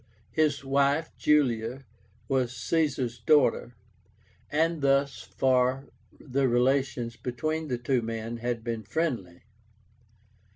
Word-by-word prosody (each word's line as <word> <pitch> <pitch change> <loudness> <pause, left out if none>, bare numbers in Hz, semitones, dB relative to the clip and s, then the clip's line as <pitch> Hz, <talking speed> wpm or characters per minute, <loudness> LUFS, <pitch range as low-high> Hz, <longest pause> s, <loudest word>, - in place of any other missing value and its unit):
His 150 -3 +1
wife, 140 +3 +1
Julia, 130 -3 +1 0.4
was 125 -2 0
Caesar's 130 -5 -1
daughter, 125 -2 +2 0.8
and 160 +1 +1
thus 140 0 +2
far 130 +6 +1 0.3
the 135 -1 0
relations 125 -1 +1
between 155 +7 -3
the 125 -3 -1
two 125 +1 0
men 115 +1 -4
had 120 -1 -3
been 115 -1 -3
friendly. 110 - -3
130 Hz, 100 wpm, -28 LUFS, 120-140 Hz, 0.8 s, daughter